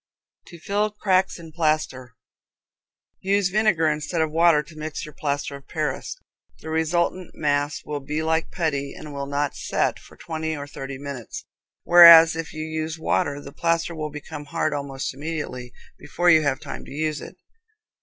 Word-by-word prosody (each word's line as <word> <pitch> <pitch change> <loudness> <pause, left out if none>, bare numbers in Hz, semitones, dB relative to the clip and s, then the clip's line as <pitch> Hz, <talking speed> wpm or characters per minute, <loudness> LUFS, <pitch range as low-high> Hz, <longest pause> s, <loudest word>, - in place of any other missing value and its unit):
To 170 - -11
Fill 205 +4 0
Cracks 190 -2 +1
in 165 -2 -11
Plaster. 155 -7 -1 1.0
Use 195 0 +1
vinegar 200 -5 +2
instead 155 +2 -1
of 160 -1 +1
water 165 -2 +4
to 160 - -16
mix 155 0 -5
your 150 - -11
plaster 145 -1 -3
of 140 0 -13
Paris. - - -3 0.4
The 160 - -8
resultant 170 +3 -1
mass 145 -1 -1
will 150 -1 -3
be 150 +3 -3
like 160 0 0
putty, 140 -5 -2
and 150 -1 -9
will 140 0 -4
not 145 0 -1
"set" - - -1
for - - -17
twenty 160 -1 -4
or 145 - -6
thirty 135 -1 -7
minutes, 140 -5 -7 0.4
whereas 170 -2 +9
if 165 0 -5
you 155 0 -5
use 160 0 -4
water 145 -2 0
the 140 - -10
plaster 165 +1 0
will 155 -2 -4
become 150 0 -8
hard 155 -1 -1
almost 140 -2 -4
immediately, 140 -4 -5 0.3
before 175 0 +2
you 160 -1 +6
have 140 -3 0
time - - -7
to - - -12
use 155 +1 -2
it. - - -10
155 Hz, 170 wpm, -24 LUFS, 145-165 Hz, 1.0 s, whereas